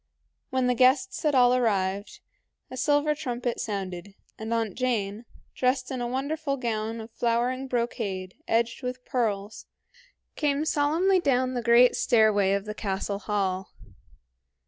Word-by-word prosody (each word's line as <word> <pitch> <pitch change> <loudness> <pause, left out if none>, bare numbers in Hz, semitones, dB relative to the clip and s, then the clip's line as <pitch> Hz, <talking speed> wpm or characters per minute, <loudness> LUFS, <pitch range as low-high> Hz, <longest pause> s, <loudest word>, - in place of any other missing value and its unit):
When 260 -1 0
the 250 - +3
guests 255 +1 +3
had 300 -3 +1
all 250 -1 +6
arrived, 200 -5 0 0.5
a - - -6
silver 290 +3 +2
trumpet 245 -5 -3
sounded, 195 -2 -5 0.2
and 220 +1 -5
Aunt 225 -4 0
Jane, 225 -3 -2 0.3
dressed 255 0 0
in 255 -2 -3
a 240 - -1
wonderful 280 +3 -2
gown 225 -2 -2
of 220 +1 -9
flowering 240 +3 0
brocade 215 -7 -3
edged 230 +2 0
with 250 0 -5
pearls, 215 -4 -2 0.7
came 295 0 0
solemnly 325 +6 +2
down 255 -5 +1
the 245 - -2
great 235 +1 +5
stairway 215 -4 +3
of 200 0 -1
the 210 - -5
castle 200 -1 -3
hall. 195 -2 -2
240 Hz, 140 wpm, -26 LUFS, 210-255 Hz, 0.7 s, all